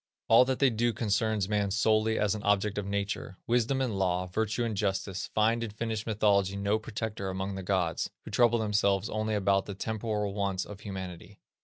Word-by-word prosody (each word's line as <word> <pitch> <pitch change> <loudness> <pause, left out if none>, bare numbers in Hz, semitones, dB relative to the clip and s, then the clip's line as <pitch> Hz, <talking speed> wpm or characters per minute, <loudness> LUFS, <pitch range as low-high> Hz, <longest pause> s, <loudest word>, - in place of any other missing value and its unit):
All 115 +3 +7
that 130 0 0
they 135 -2 +4
do 115 +1 +1
concerns 105 -2 0
man 105 -1 0
solely 110 +2 +2
as 105 -1 +2
an 105 - -4
object 105 0 +1
in 100 -1 -4
nature. 100 -1 -3
Wisdom 120 +3 +1
and 115 -7 -1
law, 90 -1 +1
virtue 110 +5 -1
and 115 -2 -2
justice, 95 -1 -2
find 115 +2 +2
in 115 - -3
Finnish 110 +1 -4
mythology 100 -3 +2
no 100 +2 +1
protector 110 -2 -4
among 95 +1 -3
the 95 - -5
gods, 90 -3 0 0.2
who - - -8
trouble 120 -1 +4
themselves 105 -2 +1
only 110 0 -1
about 100 -1 +2
the 100 - -5
temporal 105 -1 -2
wants 100 -2 -1
of 105 -2 -10
humanity." 95 -1 -8
105 Hz, 190 wpm, -29 LUFS, 95-110 Hz, 0.2 s, All